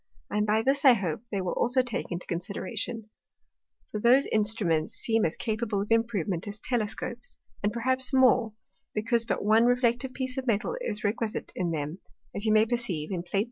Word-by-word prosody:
And 210 Hz, 0 st, 0 dB, 0.2 s
this 275 Hz, +1 st, +2 dB
I 265 Hz, -3 st, +9 dB
hope 185 Hz, -6 st, -2 dB
they 200 Hz, -2 st, -2 dB
will 185 Hz, -, -2 dB
also 250 Hz, +2 st, +2 dB
take 245 Hz, -5 st, -4 dB
into 175 Hz, +1 st, -4 dB
Consideration: 210 Hz, +5 st, -4 dB, 0.8 s
For 210 Hz, -, -3 dB
those 250 Hz, +5 st, +5 dB
Instruments 210 Hz, -4 st, +1 dB
seem 225 Hz, -1 st, +1 dB
as 160 Hz, -, -1 dB
capable 220 Hz, -2 st, -2 dB
of 210 Hz, -, -10 dB
improvement 210 Hz, -6 st, 0 dB
as 205 Hz, 0 st, -5 dB
Telescopes, 235 Hz, +1 st, -3 dB, 0.2 s
and 205 Hz, -, +1 dB
perhaps 260 Hz, +3 st, 0 dB
more, 255 Hz, -4 st, +4 dB, 0.4 s
because 230 Hz, +2 st, +2 dB
but -, -, -2 dB
one 220 Hz, +2 st, +5 dB
reflective 245 Hz, +1 st, +1 dB
piece 260 Hz, 0 st, -2 dB
of 260 Hz, -, -7 dB
Metal 230 Hz, -, 0 dB
is 210 Hz, -, -3 dB
requisite 215 Hz, +1 st, -2 dB
in 180 Hz, -2 st, -1 dB
them, 155 Hz, +2 st, -3 dB, 0.4 s
as 205 Hz, -, -2 dB
you 215 Hz, -, +3 dB
may 215 Hz, 0 st, +5 dB
perceive 220 Hz, -10 st, -2 dB
in 180 Hz, -3 st, -2 dB
_Plate 175 Hz, -, -17 dB
3. 195 Hz, -, +1 dB
220 Hz, 180 wpm, -28 LUFS, 200-240 Hz, 0.8 s, I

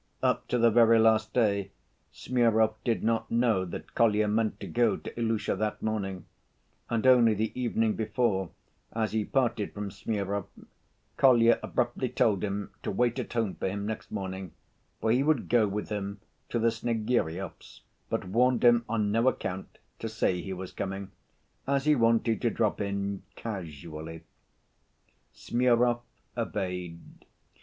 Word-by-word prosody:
Up -, -, +1 dB
to 125 Hz, -, 0 dB
the 115 Hz, -1 st, +4 dB
very 115 Hz, 0 st, +6 dB
last 110 Hz, -1 st, +3 dB
day, 100 Hz, -5 st, +1 dB, 0.4 s
Smurov 110 Hz, -3 st, +2 dB
did 115 Hz, -2 st, 0 dB
not 115 Hz, 0 st, 0 dB
know 115 Hz, -5 st, +2 dB
that 90 Hz, -, -8 dB
Kolya 110 Hz, -2 st, +3 dB
meant 110 Hz, -1 st, 0 dB
to -, -, -6 dB
go 120 Hz, 0 st, +2 dB
to -, -, -8 dB
Ilusha 115 Hz, -2 st, 0 dB
that 105 Hz, 0 st, -1 dB
morning, 95 Hz, -5 st, -2 dB, 0.6 s
and 115 Hz, 0 st, -1 dB
only 120 Hz, -4 st, +6 dB
the 110 Hz, +2 st, -1 dB
evening 115 Hz, -3 st, 0 dB
before, 105 Hz, -4 st, 0 dB, 0.4 s
as 110 Hz, -1 st, -1 dB
he 110 Hz, -1 st, 0 dB
parted 120 Hz, -5 st, 0 dB
from 100 Hz, -1 st, -4 dB
Smurov, 100 Hz, -1 st, -3 dB, 0.7 s
Kolya 120 Hz, -3 st, +5 dB
abruptly 120 Hz, +1 st, -1 dB
told 100 Hz, -5 st, +1 dB
him 100 Hz, 0 st, -3 dB
to -, -, -4 dB
wait 120 Hz, +3 st, +1 dB
at -, -, -5 dB
home 115 Hz, -5 st, 0 dB
for -, -, -3 dB
him 100 Hz, +1 st, -4 dB
next 110 Hz, +1 st, -5 dB
morning, 95 Hz, -3 st, -5 dB, 0.5 s
for 110 Hz, -, +1 dB
he 125 Hz, +3 st, +3 dB
would 150 Hz, -2 st, +1 dB
go 115 Hz, -3 st, +4 dB
with 105 Hz, +1 st, -4 dB
him 100 Hz, -1 st, -4 dB, 0.3 s
to -, -, -1 dB
the 115 Hz, 0 st, +3 dB
Snegiryovs', 110 Hz, -6 st, -2 dB, 0.3 s
but -, -, -2 dB
warned 125 Hz, +7 st, +2 dB
him 120 Hz, -1 st, +6 dB
on 105 Hz, -3 st, 0 dB
no 115 Hz, +4 st, +2 dB
account 95 Hz, -7 st, -2 dB, 0.2 s
to 115 Hz, -, -4 dB
say 95 Hz, -5 st, 0 dB
he 95 Hz, -, -6 dB
was 95 Hz, 0 st, -6 dB
coming, 95 Hz, 0 st, -5 dB, 0.6 s
as 140 Hz, 0 st, +1 dB
he 150 Hz, -, +5 dB
wanted 115 Hz, -3 st, +2 dB
to 120 Hz, -, +2 dB
drop 110 Hz, -1 st, 0 dB
in 100 Hz, -1 st, -2 dB
casually. 80 Hz, -5 st, -7 dB, 1.1 s
Smurov 120 Hz, 0 st, +2 dB, 0.3 s
obeyed. 90 Hz, -2 st, -3 dB
110 Hz, 150 wpm, -28 LUFS, 100-115 Hz, 1.1 s, very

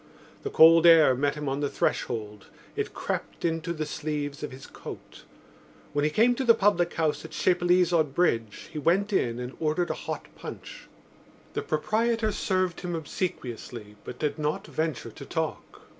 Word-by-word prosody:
The 420 Hz, -, -3 dB
cold 165 Hz, -, +7 dB
air 160 Hz, -5 st, +8 dB
met 140 Hz, +3 st, 0 dB
him 150 Hz, -1 st, -5 dB
on 135 Hz, +1 st, -1 dB
the 145 Hz, -1 st, 0 dB
threshold; 105 Hz, -6 st, -2 dB, 0.3 s
it -, -, -2 dB
crept -, -, -4 dB
into 165 Hz, 0 st, -1 dB
the 155 Hz, -2 st, -2 dB
sleeves 145 Hz, -1 st, -4 dB
of 150 Hz, -, -4 dB
his 130 Hz, +1 st, -10 dB
coat. -, -, -10 dB, 0.7 s
When 145 Hz, 0 st, +1 dB
he 150 Hz, -, +3 dB
came 230 Hz, +10 st, +4 dB
to 265 Hz, -, -2 dB
the 230 Hz, -2 st, +6 dB
public 195 Hz, -5 st, +2 dB
house 155 Hz, -2 st, 0 dB
at 160 Hz, -, -8 dB
Chapelizod 175 Hz, -4 st, +2 dB
Bridge 115 Hz, -, 0 dB
he 150 Hz, -, -3 dB
went 195 Hz, +7 st, +2 dB
in 120 Hz, -10 st, +1 dB
and 125 Hz, +1 st, -6 dB
ordered 160 Hz, +2 st, 0 dB
a -, -, -6 dB
hot -, -, -3 dB
punch. -, -, -9 dB, 0.7 s
The -, -, -1 dB
proprietor 220 Hz, +7 st, 0 dB
served 185 Hz, -3 st, -1 dB
him 175 Hz, -1 st, -3 dB
obsequiously 120 Hz, -, -5 dB
but 125 Hz, -, -8 dB
did 150 Hz, 0 st, -2 dB
not 150 Hz, 0 st, -1 dB
venture 160 Hz, -4 st, -3 dB
to -, -, -10 dB
talk. -, -, -4 dB
155 Hz, 170 wpm, -27 LUFS, 145-180 Hz, 0.7 s, air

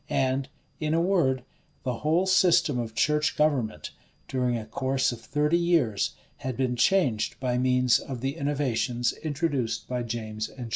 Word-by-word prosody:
And 135 Hz, 0 st, 0 dB, 0.3 s
in 155 Hz, 0 st, 0 dB
a -, -, +3 dB
word, 170 Hz, -8 st, +2 dB, 0.4 s
the 125 Hz, -2 st, -2 dB
whole 160 Hz, +5 st, +2 dB
system 180 Hz, -8 st, +4 dB
of 115 Hz, -2 st, -4 dB
church 150 Hz, 0 st, +2 dB
government, 135 Hz, -8 st, 0 dB, 0.4 s
during 125 Hz, -2 st, 0 dB
a 110 Hz, -, -6 dB
course 130 Hz, +3 st, 0 dB
of 120 Hz, -1 st, -8 dB
thirty 150 Hz, +6 st, +1 dB
years, 160 Hz, -, +1 dB, 0.2 s
had 130 Hz, -2 st, -5 dB
been 130 Hz, -2 st, 0 dB
changed 125 Hz, -, +2 dB
by 125 Hz, -1 st, 0 dB
means 125 Hz, -1 st, +3 dB
of 130 Hz, -3 st, -7 dB
the 135 Hz, +2 st, -2 dB
innovations 135 Hz, -5 st, 0 dB
introduced 140 Hz, -7 st, -1 dB
by 125 Hz, -1 st, -2 dB
James 110 Hz, -2 st, -4 dB
and -, -, -18 dB
Charles. 120 Hz, -3 st, -6 dB
130 Hz, 160 wpm, -27 LUFS, 120-150 Hz, 0.4 s, system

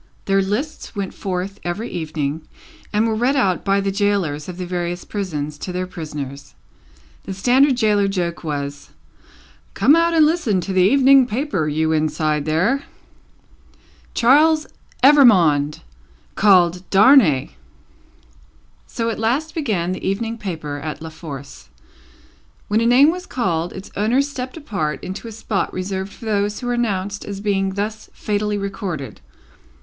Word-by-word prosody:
Their 195 Hz, 0 st, +2 dB
lists 225 Hz, +9 st, -4 dB
went 200 Hz, -2 st, -4 dB
forth 190 Hz, +1 st, -4 dB
every 195 Hz, +7 st, -3 dB
evening, 155 Hz, -2 st, -3 dB, 0.5 s
and 215 Hz, +2 st, +2 dB
were 225 Hz, -, 0 dB
read 245 Hz, +5 st, +1 dB
out 195 Hz, -10 st, +1 dB
by 195 Hz, 0 st, +2 dB
the 195 Hz, 0 st, -1 dB
gaolers 195 Hz, -7 st, -1 dB
of 180 Hz, -, -7 dB
the 180 Hz, -, -4 dB
various 175 Hz, 0 st, -3 dB
prisons 150 Hz, -7 st, -4 dB
to 185 Hz, -, -5 dB
their 180 Hz, +1 st, -2 dB
prisoners. 150 Hz, -6 st, -7 dB, 0.7 s
The 190 Hz, -, -5 dB
standard 255 Hz, +6 st, +3 dB
gaoler 210 Hz, -3 st, +3 dB
joke 175 Hz, -4 st, -3 dB
was, 145 Hz, -2 st, -5 dB, 0.9 s
"Come 290 Hz, -, +5 dB
out 335 Hz, 0 st, +2 dB
and 315 Hz, -2 st, +6 dB
listen 300 Hz, -, +1 dB
to 190 Hz, -, -4 dB
the 185 Hz, -, +3 dB
Evening 265 Hz, +5 st, +5 dB
Paper, 225 Hz, -, -1 dB
you 160 Hz, +1 st, 0 dB
inside 155 Hz, -1 st, 0 dB
there!" 185 Hz, -, +1 dB, 1.3 s
"Charles 305 Hz, +6 st, +4 dB, 0.4 s
Evrémonde, 180 Hz, -, +5 dB, 0.5 s
called 180 Hz, -3 st, +4 dB
Darnay!" 195 Hz, -, +5 dB, 1.4 s
So 230 Hz, 0 st, -2 dB
at 220 Hz, -, -5 dB
last 265 Hz, +8 st, 0 dB
began 210 Hz, -, -1 dB
the 185 Hz, -, -5 dB
Evening 225 Hz, +4 st, -2 dB
Paper 155 Hz, -8 st, -5 dB
at 155 Hz, +1 st, -5 dB
La 160 Hz, -, -7 dB
Force. 140 Hz, -4 st, -10 dB, 1.0 s
When 215 Hz, +2 st, +2 dB
a 230 Hz, -, +2 dB
name 270 Hz, +6 st, +6 dB
was 365 Hz, +2 st, -7 dB
called, 175 Hz, -8 st, -1 dB
its 190 Hz, -, -10 dB
owner 230 Hz, +7 st, +2 dB
stepped 265 Hz, -1 st, -6 dB
apart 195 Hz, -, -3 dB
into 190 Hz, +5 st, -6 dB
a -, -, -7 dB
spot 215 Hz, -2 st, -2 dB
reserved 190 Hz, +1 st, -4 dB
for 230 Hz, -, -12 dB
those 205 Hz, -1 st, 0 dB
who 250 Hz, -, -7 dB
were 245 Hz, -, 0 dB
announced 205 Hz, -4 st, -2 dB
as 200 Hz, -1 st, -6 dB
being 195 Hz, -2 st, -1 dB
thus 215 Hz, +2 st, -4 dB
fatally 210 Hz, 0 st, -2 dB
recorded. 190 Hz, -, -5 dB
195 Hz, 145 wpm, -20 LUFS, 170-230 Hz, 1.4 s, and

